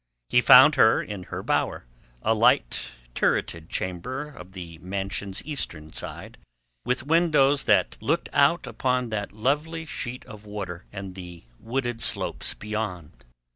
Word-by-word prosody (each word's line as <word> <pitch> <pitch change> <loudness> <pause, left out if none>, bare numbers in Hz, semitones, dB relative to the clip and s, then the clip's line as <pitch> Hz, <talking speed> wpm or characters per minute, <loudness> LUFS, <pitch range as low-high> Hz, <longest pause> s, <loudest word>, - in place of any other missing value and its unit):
He 125 - +5
found 135 +3 +9
her 110 - +6
in 100 -4 -6
her - - -6
bower—a - - -2
light, 115 - +2 0.3
turreted 85 +5 0
chamber 130 +12 -4
on 90 +1 -11
the 85 -3 -9
mansion's 95 +2 -3
eastern 85 - -5
side, - - -5 0.4
with 125 +1 -1
windows 150 -3 +3
that - - +3
looked 165 +4 0
out 145 +4 +3
upon 125 -2 -1
that 105 -2 -3
lovely 150 +9 -1
sheet 125 -4 -6
of 105 -1 -11
water 100 -4 -6
and 95 -2 -7
the 90 -2 -10 0.2
wooded 120 -1 -3
slopes - - 0
beyond. 90 - -5
110 Hz, 135 wpm, -25 LUFS, 90-135 Hz, 0.4 s, found